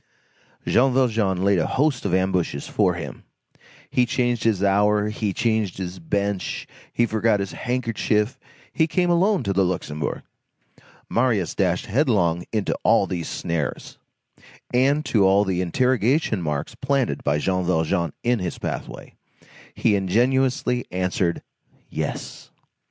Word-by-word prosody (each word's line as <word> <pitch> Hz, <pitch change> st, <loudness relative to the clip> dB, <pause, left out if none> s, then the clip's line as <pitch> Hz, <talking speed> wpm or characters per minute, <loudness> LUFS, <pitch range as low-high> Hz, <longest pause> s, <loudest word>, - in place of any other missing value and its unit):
Jean 130 Hz, +2 st, +3 dB
Valjean 110 Hz, -8 st, +1 dB
laid 100 Hz, -2 st, +3 dB
a 80 Hz, -, 0 dB
host 140 Hz, -4 st, 0 dB
of 95 Hz, -, 0 dB
ambushes 95 Hz, -6 st, 0 dB
for -, -, +1 dB
him; -, -, -7 dB, 0.7 s
he 125 Hz, -, +3 dB
changed 120 Hz, -1 st, 0 dB
his 105 Hz, -4 st, +1 dB
hour, 105 Hz, +1 st, +3 dB
he 105 Hz, -1 st, -2 dB
changed 110 Hz, -2 st, 0 dB
his 90 Hz, -1 st, -5 dB
bench, 100 Hz, +3 st, -2 dB, 0.2 s
he 120 Hz, -, +2 dB
forgot 110 Hz, -1 st, +1 dB
his 100 Hz, -1 st, -3 dB
handkerchief, 115 Hz, -2 st, -1 dB, 0.3 s
he 160 Hz, -, +2 dB
came 175 Hz, +2 st, +1 dB
alone 185 Hz, +3 st, +2 dB
to 100 Hz, -, -1 dB
the 95 Hz, 0 st, +3 dB
Luxembourg; 80 Hz, -5 st, -3 dB, 0.8 s
Marius 115 Hz, -8 st, +1 dB
dashed -, -, 0 dB
headlong 100 Hz, -, +1 dB
into 110 Hz, -3 st, -1 dB
all -, -, +4 dB
these 85 Hz, -3 st, -4 dB
snares; 80 Hz, -5 st, -4 dB, 0.7 s
and 140 Hz, +4 st, +3 dB
to 110 Hz, -6 st, +2 dB
all 100 Hz, +2 st, +4 dB
the 95 Hz, -2 st, 0 dB
interrogation 125 Hz, -, +1 dB
marks 75 Hz, +3 st, -3 dB
planted 135 Hz, +1 st, -1 dB
by 75 Hz, +1 st, +1 dB
Jean 95 Hz, +4 st, 0 dB
Valjean 85 Hz, -1 st, 0 dB
in 120 Hz, -1 st, +2 dB
his 90 Hz, -2 st, -4 dB
pathway, -, -, -6 dB, 0.6 s
he 110 Hz, -, +2 dB
ingenuously 125 Hz, -, +1 dB
answered 90 Hz, -1 st, -1 dB, 0.5 s
"yes." -, -, -5 dB
105 Hz, 135 wpm, -23 LUFS, 90-125 Hz, 0.8 s, all